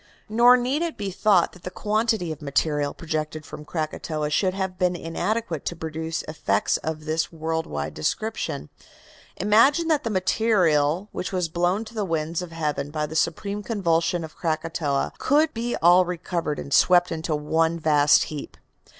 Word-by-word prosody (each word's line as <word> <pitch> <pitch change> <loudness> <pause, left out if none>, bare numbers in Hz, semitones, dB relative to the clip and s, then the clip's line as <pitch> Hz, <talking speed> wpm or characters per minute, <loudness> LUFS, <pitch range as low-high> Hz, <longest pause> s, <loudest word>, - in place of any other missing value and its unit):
Nor 240 +3 +6
need 255 +5 -1
it 340 -2 -2
be 200 -2 -3
thought 190 -2 +3
that 180 - -16
the 180 - -5
quantity 215 -2 0
of 155 - -7
material 145 0 0
projected 155 -1 -4
from 150 0 -9
Krakatoa 155 -1 -3
should 185 +4 +1
have 190 -2 -3
been 180 -1 +2
inadequate 175 +1 -2
to 175 - -2
produce 160 0 -4
effects 105 -10 0
of 155 -1 -5
this 160 +1 -1
world 160 0 -3
wide 75 +1 -4
description. 215 - -3 0.7
Imagine 270 +11 +4
that 300 -2 +2
the 230 - -2
material 185 -5 +2
which - - -4
was 180 -3 -1
blown 175 +6 0
to 220 - -12
the 215 -2 -2
winds 165 -1 -2
of 180 -2 -7
heaven 150 -3 -2
by 150 0 -2
the 155 +1 -8
supreme 200 +6 -1
convulsion 175 -5 0
of 160 - -9
Krakatoa 155 -3 -1
could 300 +3 +2
be 235 +1 -2
all 175 +2 +7
recovered 170 -3 -3
and 140 - -5
swept 175 0 +5
into 160 -1 -2
one 160 +3 +1
vast 150 -2 +4
heap. 150 -2 -7
170 Hz, 165 wpm, -24 LUFS, 155-200 Hz, 0.7 s, all